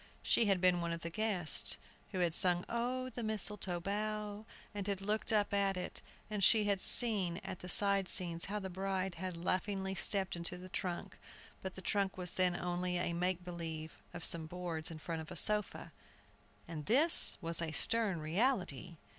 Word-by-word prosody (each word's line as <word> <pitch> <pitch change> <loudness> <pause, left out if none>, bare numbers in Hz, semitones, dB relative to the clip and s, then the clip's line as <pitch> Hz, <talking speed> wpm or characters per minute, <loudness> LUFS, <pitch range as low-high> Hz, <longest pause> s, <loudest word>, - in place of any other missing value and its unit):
She 230 - +3
had 195 -2 +2
been 180 -1 +3
one 170 0 -2
of 170 - -6
the 170 - -5
"guests," 195 -5 +1 0.3
who 185 -3 -2
had 170 -2 +1
sung 175 0 +2
"Oh, 255 +2 -2
the 240 - -6
Mistletoe 210 -4 0
Bough," 210 +2 -4 0.3
and 205 -1 -5
had 200 -2 -1
looked 210 +3 +1
up 210 -2 +1
at 195 -1 +1
it, 180 - -5 0.3
and 210 -2 -3
she 220 +1 +6
had 200 -2 0
seen 200 -8 +3
at 190 -2 -6
the 180 - -8
side 200 0 +6
scenes 170 -3 0
how 205 +2 -3
the 190 -2 -5
bride 190 0 -2
had 180 0 -6
laughingly 190 +2 -2
stepped 195 0 0
into 170 +1 -2
the 185 +1 -10
trunk. 175 -1 -5 0.4
But 190 -1 -6
the 190 - -8
trunk 200 0 0
then 180 0 0
was 175 - -5
only 180 0 -2
a 175 -1 -1
make 180 +1 -1
believe 165 -3 -7
of 175 - -4
some 165 -2 +1
boards 170 -2 -4
in 165 - -8
front 160 +1 -5
of 160 - -10
a - - -8
sofa, 210 -1 +1 0.8
and 155 -3 -7
this 300 +8 +7
was 165 -2 -4
a 165 -2 -3
stern 200 0 +1
reality. 180 - -1
185 Hz, 190 wpm, -34 LUFS, 175-205 Hz, 0.8 s, this